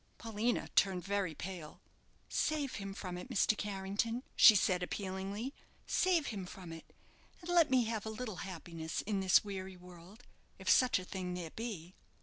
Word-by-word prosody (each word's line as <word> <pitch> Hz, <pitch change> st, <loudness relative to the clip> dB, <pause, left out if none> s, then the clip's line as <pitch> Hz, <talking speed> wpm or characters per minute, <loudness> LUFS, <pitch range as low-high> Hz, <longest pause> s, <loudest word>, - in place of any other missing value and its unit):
Paulina 225 Hz, +1 st, -1 dB
turned 185 Hz, -2 st, +2 dB
very 195 Hz, -5 st, -1 dB
pale. 175 Hz, -3 st, -7 dB, 0.5 s
"Save 295 Hz, -4 st, 0 dB
him 195 Hz, -2 st, -5 dB
from 180 Hz, -3 st, -5 dB
it, -, -, -9 dB
Mr. 215 Hz, -, +3 dB
Carrington," 205 Hz, +4 st, -2 dB
she 220 Hz, -, +10 dB
said, 180 Hz, -2 st, +2 dB
appealingly. 195 Hz, +6 st, -3 dB, 0.3 s
"Save 355 Hz, -5 st, +2 dB
him 190 Hz, -3 st, -5 dB
from 180 Hz, -3 st, -9 dB
it, 165 Hz, -, -11 dB, 0.5 s
and 350 Hz, 0 st, -5 dB
let 340 Hz, -3 st, +5 dB
me 255 Hz, -2 st, +4 dB
have 220 Hz, -2 st, -3 dB
a -, -, -1 dB
little 220 Hz, -3 st, -5 dB
happiness 165 Hz, -3 st, -5 dB
in 200 Hz, -1 st, -1 dB
this 190 Hz, -1 st, +5 dB
weary 190 Hz, -2 st, -6 dB
world, 180 Hz, +5 st, -14 dB, 0.3 s
if 190 Hz, -, -11 dB
such 250 Hz, +1 st, +5 dB
a 185 Hz, -, -5 dB
thing 180 Hz, -2 st, -4 dB
there 170 Hz, -3 st, -5 dB
be." 195 Hz, -7 st, -6 dB
195 Hz, 165 wpm, -34 LUFS, 180-225 Hz, 0.5 s, she